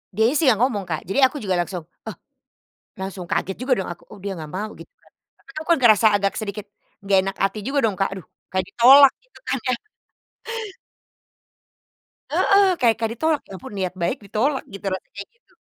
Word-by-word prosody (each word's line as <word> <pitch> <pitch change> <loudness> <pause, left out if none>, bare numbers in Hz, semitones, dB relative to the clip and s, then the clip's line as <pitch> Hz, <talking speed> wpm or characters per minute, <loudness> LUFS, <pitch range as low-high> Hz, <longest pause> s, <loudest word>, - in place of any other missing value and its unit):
Dianya 220 +5 +3
sih 325 - +1
yang 220 -3 +2
ngomong 215 -7 +1
Kak, 160 -2 -3
jadi 265 +7 +4
aku 285 +2 -2
juga 190 -4 -1
langsung, 175 0 -3 0.2
oh, - - -6 0.9
langsung 190 -1 -5
kaget 190 +2 -2
juga 255 +1 -1
dong - - -5
aku, 175 - -8
oh 210 - -11
dia 195 0 -5
nggak 155 -2 -8
mau 210 +3 -3
gitu - - -14
kan. - - -27 0.3
Tapi - - -18
aku 310 0 -5
kan 335 - +3
ngerasa 225 -3 +6
agak 200 -1 0
sedikit 210 -1 -6 0.4
nggak 195 -1 +3
enak 195 0 -4
hati 195 +2 -1
juga 275 +4 -1
dong, 200 - -4
Kak, 195 +1 -1
aduh 190 -4 -8 0.3
kayak 185 0 0
ditolak 270 +3 +7
gitu - - -20
kan - - +1
ya? - - +3 2.6
Heeh, 395 0 +4
kayak 230 -2 +4
kayak 225 -1 -1
ditolak, 315 +2 +1
ya - - -11
ampun - - -10
niat 185 -2 -2
baik 170 +11 0
ditolak 255 +8 -1
gitu 195 0 -10
rasanya 190 - -7
kayak - - -7
gitu. 470 - -34
210 Hz, 200 wpm, -22 LUFS, 190-260 Hz, 2.6 s, ditolak